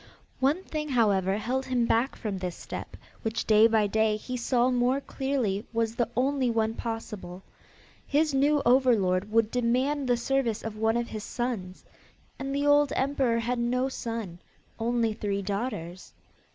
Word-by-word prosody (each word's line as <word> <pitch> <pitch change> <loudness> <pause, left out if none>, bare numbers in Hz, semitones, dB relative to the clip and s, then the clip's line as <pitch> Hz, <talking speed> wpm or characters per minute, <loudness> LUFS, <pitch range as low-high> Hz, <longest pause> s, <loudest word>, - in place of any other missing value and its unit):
One 285 +8 +2
thing, 305 -3 -4
however, 200 -6 +2
held 255 +5 -2
him 250 -2 +1
back 230 +4 +1
from 205 -4 -4
this 180 -2 -4
step - - -8 0.2
which 225 0 -2
day 215 +1 +6
by 220 -2 +3
day 220 +1 +2
he 250 +4 -6
saw 250 +1 +2
more 250 +2 +2
clearly 265 -8 -2
was 225 -1 0
the 235 -1 -1
only 265 0 +2
one 225 -1 +1
possible. 210 -6 -6 0.6
His 300 +1 +2
new 285 +2 +3
overlord 215 -7 +3
would 225 0 +2
demand 255 +4 +1
the 245 -1 +3
service 240 -3 0
of 220 -1 -5
one 225 +1 +1
of 240 0 -2
his 215 -1 -6
sons. 220 -8 -4 0.5
And 270 +1 -4
the 285 +1 0
old 290 -1 +4
emperor 265 -3 +1
had 240 +1 -1
no 250 +2 0
son; 225 -9 -5 0.4
only 230 -1 +1
three 200 -1 -2
daughters. 190 -4 -4
235 Hz, 160 wpm, -27 LUFS, 215-260 Hz, 0.6 s, day